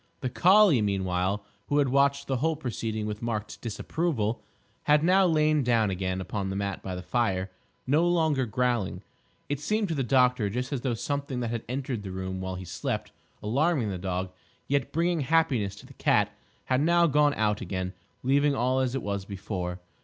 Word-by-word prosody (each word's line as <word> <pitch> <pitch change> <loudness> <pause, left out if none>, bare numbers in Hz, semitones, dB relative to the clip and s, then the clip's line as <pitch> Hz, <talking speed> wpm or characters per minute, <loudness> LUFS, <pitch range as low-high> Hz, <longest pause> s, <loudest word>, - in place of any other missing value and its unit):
The 130 - -2
collie, 185 - +6
meanwhile, 95 0 0 0.2
who 145 - +1
had 140 -2 +3
watched 140 +1 +2
the 135 -2 -1
whole 160 +5 +1
proceeding 115 -6 -3
with 105 +1 -4
marked 105 -3 -4
disapproval, 115 -1 -2 0.4
had 150 +1 +4
now 185 +2 +5
lain 155 -2 +3
down 115 -4 +2
again 95 0 -2
upon 95 +1 -3
the 95 - -3
mat 100 -1 -3
by 95 -1 -5
the 90 - -6
fire, 95 -6 0 0.3
no 155 +6 +3
longer 160 -7 +2
growling. 120 -1 -1 0.4
It 145 -1 -2
seemed 210 +6 0
to - - 0
the 140 - -1
doctor 125 -3 +3
just 125 +6 -3
as 130 - -2
though 120 -2 -1
something 140 +1 -3
that 115 -1 -2
had 115 -1 -3
entered 130 -3 -3
the 100 - -7
room 95 0 -4
while 95 0 -3
he 90 0 -7
slept, 90 0 -3 0.3
alarming 130 +1 +1
the 95 - -4
dog, 90 0 -3 0.4
yet 140 -2 0
bringing 170 +1 +1
happiness 130 -9 +1
to 100 - -13
the - - -14
cat, - - +2 0.3
had 130 +1 +1
now 170 +2 +4
gone 150 -1 +3
out 105 -1 +1
again, 95 0 -3 0.3
leaving 140 +2 +3
all 130 +1 +1
as 130 -1 0
it 135 - -2
was 100 -1 -2
before. 95 -2 -5
125 Hz, 190 wpm, -27 LUFS, 100-145 Hz, 0.4 s, collie